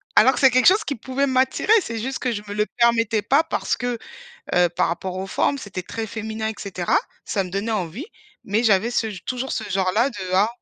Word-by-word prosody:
Alors 260 - +6
que 245 - -3
c'est 265 - +7
quelque 255 0 +3
chose 405 +4 +5
qui 285 - -3
pouvait 260 +4 -1
m'attirer, 260 +10 +1
c'est 230 -6 -5
juste 265 +4 -3
que 255 - -1
je 205 -2 -3
me 205 - -5
le 210 0 +1
permettais 230 -2 +3
pas 280 +8 +3
parce 320 - -2
que, 245 -1 -2 0.6
heu, 180 -1 +4
par - - 0
rapport 185 +2 -4
aux 190 +1 -4
formes, 280 +7 0
c'était 195 -6 -6
très 225 +4 -5
féminin 220 +1 -4
et 220 - -4
cetera. 185 -3 -1 0.3
Ça 195 -3 -1
me 180 - -8
donnait 200 +4 -2
envie, 210 - -3 0.4
mais 215 +4 0
j'avais 220 +1 +3
ce 225 -2 0 0.2
toujours 255 +1 -3
ce - - -2
genre-là 195 +7 +1
de 210 - -12 0.2
ah 200 +4 +4
225 Hz, 225 wpm, -22 LUFS, 195-255 Hz, 0.6 s, c'est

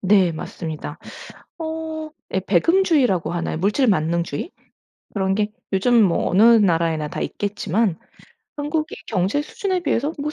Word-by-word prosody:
네. 190 -3 +4
맞습니다. 160 0 -6 0.6
어 320 0 -4 0.5
예 190 - +2
배금주의라고 240 - +2
하나요? 170 -2 -2
물질만능주의? 170 - 0 0.6
그런 190 -1 0
게 210 0 0 0.2
요즘 225 +4 +4
뭐 175 -4 +1
어느 190 +4 +4
나라에나 170 -9 +4
다 - - -5
있겠지만 205 -2 -1 0.6
한국이 305 +2 -2
경제 205 +8 0
수준에 375 +3 -2
비해서 290 -1 0
못 300 +2 -3
205 Hz, 295 characters per minute, -22 LUFS, 170-290 Hz, 0.6 s, 네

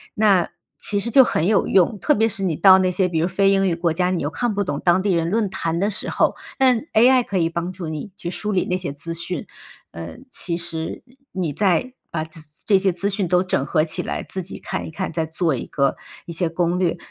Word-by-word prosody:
那 200 -5 +3 0.3
其 205 -1 0
实 235 +3 -3
就 265 +1 +8
很 165 -8 0
有 205 0 +2
用。 195 +2 +3
特 300 - +2
别 220 +1 +3
是 205 -3 -4
你 170 -5 0
到 190 +1 +7
那 185 - +2
些 180 +1 +1
比 165 -3 -1
如 170 - +1
非 195 +2 +2
英 195 -1 +2
语 170 - +1
国 170 -1 0
家， 180 +1 +1
你 180 -5 -1
又 145 - -2
看 240 -4 -1
不 205 - +1
懂 185 - -3
当 180 +1 +3
地 200 - +1
人 170 -1 0
论 215 0 +1
坛 165 -2 -2
的 205 +2 +1
时 - - 0
候， - - +2 0.2
但 255 -3 +4
AI 250 +3 +5
可 195 - -3
以 165 -2 +2
帮 170 +2 -3
助 180 -3 -7
你 155 +6 -6
去 175 -2 -5
梳 210 +2 -2
理 190 -3 +1
那 180 - -1
些 180 -5 -3
资 155 +4 -1
讯。 170 0 -4 0.5
嗯， 85 - -9
其 170 -2 -2
实 165 -2 -4 0.3
你 180 -5 -2
在 200 - +1 0.2
把 155 -2 -2
咨 160 +1 -11 0.3
这 200 - +5
些 190 0 +2
资 190 +4 0
讯 195 -2 -1
都 180 +1 +3
整 160 -7 -1
合 155 +1 +2
起 160 - -1
来， - - -4
自 190 - -2
己 185 - -8
看 - - -4
一 - - -8
看， 160 - -4
再 160 -1 -1
做 160 -2 0
一 - - -5
个 140 -1 0 0.3
一 170 - -8
些 170 +1 -1
攻 175 +1 0
略， 175 -1 +1
180 Hz, 275 characters per minute, -21 LUFS, 165-200 Hz, 0.5 s, 就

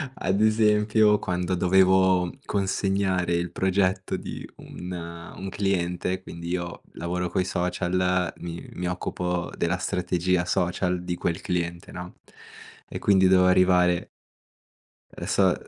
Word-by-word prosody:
ad 95 +3 0
esempio, 105 -1 +4
quando 90 -1 -2
dovevo 95 0 +4
consegnare 95 -2 0
il 85 0 -2
progetto 95 +1 0
di - - -7
un 90 +1 -9 0.5
un 95 - -5
cliente, 95 -1 -1
quindi 85 -1 -8
io 85 -1 -3
lavoro 90 +1 -3
coi 90 +1 0
social, 90 0 0
mi 85 0 -7
mi 90 0 -3
occupo 90 -1 -2
della 85 +2 0
strategia 90 0 0
social 90 0 0
di 90 0 -2
quel 85 -1 -2
cliente, 85 -1 -3
no, 90 0 -8 0.7
e - - -6
quindi 95 -2 +4
dovevo 90 -1 +5
arrivare 90 -1 +4 1.0
e - - -8
so - - +3
90 Hz, 120 wpm, -25 LUFS, 90-95 Hz, 1.0 s, dovevo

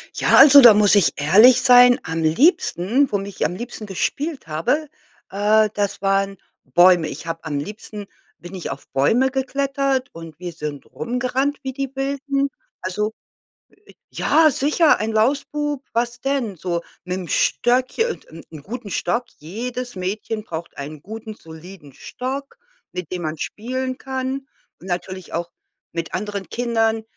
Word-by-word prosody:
Ja, - - +3
also, 280 +1 +10
da 235 -3 +10
muss 205 0 +4
ich 200 - +4
ehrlich 210 - +6
sein, 245 0 +7
am 165 0 -3
liebsten, 250 - +2
womit 200 0 -1
ich - - -1
am 170 +4 -2
liebsten 230 0 -7
gespielt 285 - -3
habe, 165 - -1 0.4
äh, 210 +2 +3
das 205 -1 -2
waren 195 0 +1 0.3
Bäume. 175 +4 +5
Ich 160 - -8
habe 165 0 -5
am 145 -2 -2
liebsten 210 +3 -8 0.3
bin 175 +2 -12
ich 180 - -5
auf - - -9
Bäume 225 - +2
geklettert 275 0 -1
und 165 -2 -10
wir 180 -1 -5
sind 150 -3 -6
rumgerannt, 255 +4 -2
wie 265 - -3
die 275 -1 -4
Wilden. 275 +1 -1 0.3
Also 210 +4 -2 0.8
äh, - - -15 0.2
ja, 320 -1 +4
sicher 300 +4 +3
ein 220 +1 -1
Lausbub, 285 +5 0
was 240 +1 -1
denn? 270 -7 -1
So 170 0 -2 0.2
mit'm 180 0 -4
Stöckchen 255 - +1
und - - -11
'n 165 0 -11
'n 155 -2 -10
guten 225 - -7
Stock. 235 +8 -1
Jedes 245 +9 -6
Mädchen 205 +4 -4
braucht 170 -4 -7
einen 145 +1 -7
guten 220 +4 -8
soliden 160 -4 -13
Stock, 270 - -6 0.3
mit 180 -3 -6
dem 180 - -3
man 155 0 -3
spielen 255 +3 -4
kann 265 +1 -4 0.4
und - - -13
natürlich 185 0 -5
auch 170 0 -3 0.4
mit 165 -1 -4
anderen 200 0 -4
Kindern, 225 -2 0
215 Hz, 150 wpm, -21 LUFS, 175-260 Hz, 0.8 s, also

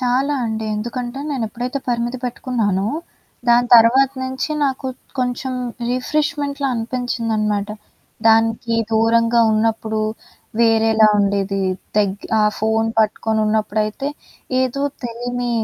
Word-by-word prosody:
చాలా 260 +3 +1
అండి. 220 -1 -3
ఎందుకంటే 240 +4 -4
నేనెప్పుడైతే 245 +1 -3
పరిమితి 240 +1 -1
పెట్టుకున్నానో, 220 -6 -1 0.6
దాని 240 +1 +5
తర్వాత 250 +4 +5
నుంచి 260 +4 -3
నాకు 265 -1 -2 0.3
కొంచెం 250 +1 -1 0.4
రిఫ్రిష్మెంట్‌లా 285 +1 -1
అనిపించిందనమాట. 225 -3 -1 0.6
దానికి 225 +1 +3 0.2
దూరంగా 230 +1 +3
ఉన్నప్పుడు 220 0 0 0.6
వేరేలా 225 -1 +4
ఉండేది. 200 -1 0 0.4
దగ్ 200 -1 +1
ఆ - - +4 0.2
ఫోను 225 +1 +1
పట్టుకొని 220 0 +1
ఉన్నప్పుడైతే 215 +4 -1 0.5
ఏదో 260 +2 -1 0.2
తెలీని 245 +1 -3
230 Hz, 95 wpm, -20 LUFS, 220-250 Hz, 0.6 s, దాని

